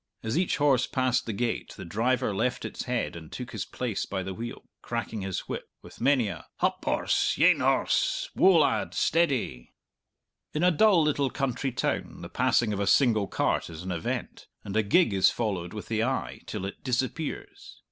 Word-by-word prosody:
As 110 +1 -2
each 180 +2 +1
horse 140 -4 +3
passed 130 -3 0
the - - -1
gate 115 +2 -2
the - - -7
driver 115 +5 0
left 125 +6 -1
its - - -5
head, 125 -7 -2
and 80 -2 -10
took 125 -1 -6
his 110 -4 -4
place 120 -5 -3
by 95 -1 -3
the 95 0 -5
wheel, 120 +5 -7 0.2
cracking 115 -2 -4
his 95 -1 -3
whip, - - -6
with - - -14
many 130 -3 +3
a - - -7
"Hup, 185 0 0
horse; - - +1
yean, - - +5
horse; - - +1
woa, 185 -2 +6
lad; 155 - +2
steady!" 135 - +1 0.9
In 155 - +1
a 180 - +6
dull 180 0 +5
little 145 -3 +1
country 135 0 -2
town - - -2
the - - -7
passing 110 -3 +2
of 100 - -3
a 100 - 0
single 110 -4 +4
cart - - 0
is 80 +1 -8
an 95 - -4
event, 85 -2 -4 0.2
and 100 - -6
a 110 - +4
gig 110 - +3
is 95 -1 +5
followed 95 -7 -2
with 105 - -7
the 110 -1 0
eye 130 +2 -2
till 100 -3 -4
it 95 - -7
disappears. 165 - -3
120 Hz, 190 wpm, -27 LUFS, 100-145 Hz, 0.9 s, woa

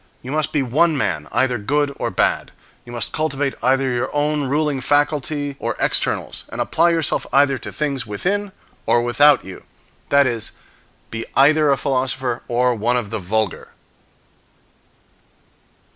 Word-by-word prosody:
You 130 - -6
must 155 0 0
be 145 -3 +1
one 155 +5 +2
man, - - -1
either 125 -2 +1
good 140 +6 0
or - - -1
bad. - - 0 0.4
You 120 - -11
must 120 -3 -3
cultivate 145 -3 -1
either 135 +2 +2
your 125 +1 -1
own 150 0 +1
ruling 145 0 0
faculty 145 0 0
or - - -2
externals, - - 0
and - - -7
apply 170 +2 +2
yourself 165 -3 0
either 140 -1 +3
to - - -7
things 140 -6 -2
within 195 - -2 0.4
or 120 - +3
without 145 +4 +4
you; 95 -1 -9 0.5
that 140 0 +5
is, 115 -4 -2 0.6
be 115 0 -4
either 150 +3 +5
a 135 - +2
philosopher, 130 -3 -1
or 125 +1 +2
one 120 +2 0
of 110 -4 -4
the 110 - -2
vulgar. 105 +2 -2
135 Hz, 150 wpm, -20 LUFS, 120-150 Hz, 0.6 s, that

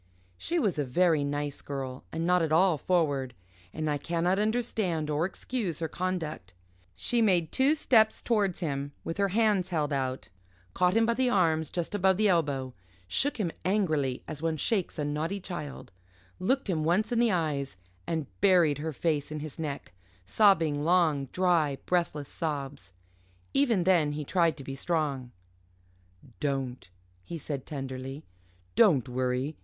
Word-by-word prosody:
She 345 - -2
was 205 - +1
a - - +2
very 155 +3 +2
nice 145 0 -3
girl 135 -2 -5
and 165 +1 -2
not 180 0 +3
at 160 -2 0
all 170 -1 +4
forward, 145 -8 0 0.4
and 155 0 -3
I 145 -1 0
cannot 175 +5 0
understand 210 -8 0
or 155 +4 +1
excuse 195 - -4
her 165 - -2
conduct. 160 - -4 0.4
She 235 - 0
made 180 -7 +2
two 275 +3 +3
steps 220 -7 +3
towards 205 -6 +1
him 140 -3 -3
with 165 - -5
her 200 - +3
hands 200 -2 +2
held 155 -4 -1
out 130 -1 -2 0.4
caught 180 +1 +2
him 225 - +4
by 235 - +2
the 255 +1 +1
arms 160 - +2
just 175 +1 -3
above 190 -2 +3
the 215 0 +3
elbow 140 -7 0 0.3
shook 280 - 0
him 190 -7 -1
angrily, 155 -9 0
as 155 -2 -5
one 160 -1 0
shakes 195 +3 -1
a 150 - -1
naughty 155 +7 -2
child 150 -7 -7 0.5
looked 265 +8 0
him 165 -5 0
once 185 +8 +1
in 235 - +2
the 235 -2 +4
eyes 145 - -1 0.3
and 160 -3 -1 0.2
buried 175 -7 +4
her 160 +1 -3
face 150 0 -1
in 155 - -4
his 155 +1 -8
neck 145 - -5 0.3
sobbing 160 - +3
long, 160 -5 +3
dry, 165 -4 +1
breathless 170 -5 0
sobs. 140 - -4 0.6
Even 240 -10 +3
then 170 -5 +3
he 150 0 -4
tried 170 0 +2
to 140 - -8
be 135 - -6
strong. 140 -4 -2 1.1
"Don't!" 135 - -3 0.3
he 170 - -6
said 140 -3 -5
tenderly, 135 0 -6 0.5
"don't 165 - +4
worry. 130 +3 -1
160 Hz, 160 wpm, -29 LUFS, 145-185 Hz, 1.1 s, all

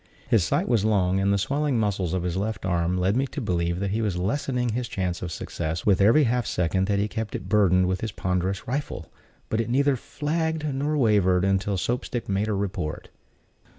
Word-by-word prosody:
His 110 -6 +3
sight 80 - 0
was 115 -5 +2
long, 95 -3 +2
and 100 +1 +2
the 100 - +3
swelling 140 +5 0
muscles 100 -5 0
of 90 - -1
his 90 -1 -2
left 100 0 -3
arm 90 0 0
led 95 +3 +1
me 135 +2 +1
to 145 - -6
believe 85 -6 -1
that 100 0 -1
he 110 +3 0
was 100 -5 -1
lessening 125 +5 -1
his 120 +2 -2
chance 90 -4 -3
of 90 - -4
success 80 +1 -4
with 100 -2 +4
every 115 +10 +6
half 125 -1 0
second 95 +2 0
that 100 -1 +1
he 100 +1 +1
kept 110 0 -4
it - - -5
burdened 95 -3 +4
with 95 0 -1
his 115 - -3
ponderous 95 +1 -2
rifle; 140 +4 -4 0.4
but 110 - 0
it 115 - -4
neither 140 +2 +3
flagged 155 +4 -2
nor 145 +1 -1
wavered 100 -7 +3
until 95 0 +1
Soap 120 +6 -1
stick 120 - -4
made 100 +2 0
her 105 -2 0
report. 95 -6 -3
100 Hz, 215 wpm, -25 LUFS, 90-120 Hz, 0.4 s, every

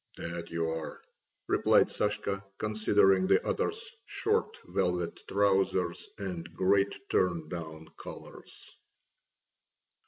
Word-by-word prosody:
"That 85 0 -5
you 85 -1 -1
are!" 80 -1 -4 0.5
replied - - +4
Sashka, 105 -1 -1
considering 100 -3 +3
the - - +4
other's 450 +2 -2
short 445 +1 0
velvet 90 -1 -1
trousers 95 -3 +1
and 90 -4 -5
great 100 +1 +2
turndown 80 -2 -1
collars. - - -11
95 Hz, 90 wpm, -30 LUFS, 85-100 Hz, 0.5 s, replied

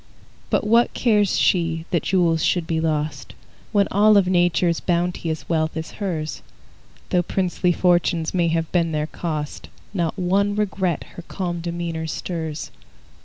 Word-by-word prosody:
But - - +1
what 230 +3 +3
cares 210 -5 +2
she 165 -2 +1
that 170 - +2
jewels 170 -3 +2
should 175 -3 +1
be 165 -1 -1
lost, 155 -1 -2 0.4
When 200 -2 +3
all 210 +1 +5
of 195 - +4
Nature's 175 -1 +2
bounteous 170 -2 -1
wealth 160 -1 0
is 160 - -5
hers? 160 -6 -3 0.7
Though 180 - +3
princely 180 0 0
fortunes 175 -2 +2
may 175 -2 +2
have 165 -1 -1
been 170 -2 +1
their 150 0 0
cost, 155 -2 -5 0.2
Not 170 -2 -1
one 200 +3 +1
regret 190 -5 -1
her - - -8
calm 175 -3 -3
demeanor 170 -1 -3
stirs. 160 -1 -4
175 Hz, 145 wpm, -22 LUFS, 160-185 Hz, 0.7 s, all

